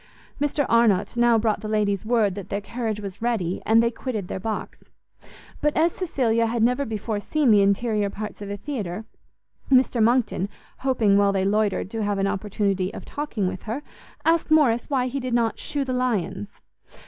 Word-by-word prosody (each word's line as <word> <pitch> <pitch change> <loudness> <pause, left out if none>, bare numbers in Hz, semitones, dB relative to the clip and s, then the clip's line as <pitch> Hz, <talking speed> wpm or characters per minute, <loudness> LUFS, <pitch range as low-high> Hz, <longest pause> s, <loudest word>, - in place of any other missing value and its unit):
Mr 290 0 +1
Arnott 230 -3 +3
now 240 -1 +4
brought 220 -1 +1
the 215 - -5
ladies 210 -2 0
word 220 -5 +2
that 195 -1 -8
their 200 - -1
carriage 220 0 -4
was 200 -1 -8
ready, 215 -7 -1
and 225 +1 +5
they 235 - +1
quitted 225 -6 -4
their - - -3
box: 215 +2 -5 0.8
but 300 0 +1
as 330 +2 +4
Cecilia 235 -11 0
had 230 0 0
never 250 +4 +2
before 215 -1 -3
seen 280 +4 +1
the 205 -1 +6
interior 205 +1 +1
parts 210 +1 -7
of 200 - -6
a 205 - -4
theatre, 215 - -5 0.7
Mr 255 -2 +4
Monckton, 220 -4 +2 0.3
hoping 225 -7 +3
while 200 0 +4
they 190 -1 0
loitered 205 -1 0
to 225 - -3
have 205 -1 0
an 195 - +1
opportunity 195 -1 -1
of - - -8
talking 260 -10 -3
with 185 0 -4
her, 265 +7 -3 0.4
asked 330 0 +2
Morrice 285 -7 +3
why 265 -3 +1
he 260 +2 -2
did 250 -2 -2
not 230 -2 +1
_shew 285 -2 -2
the 255 - -2
lions? 220 - -1
225 Hz, 185 wpm, -24 LUFS, 200-250 Hz, 0.8 s, the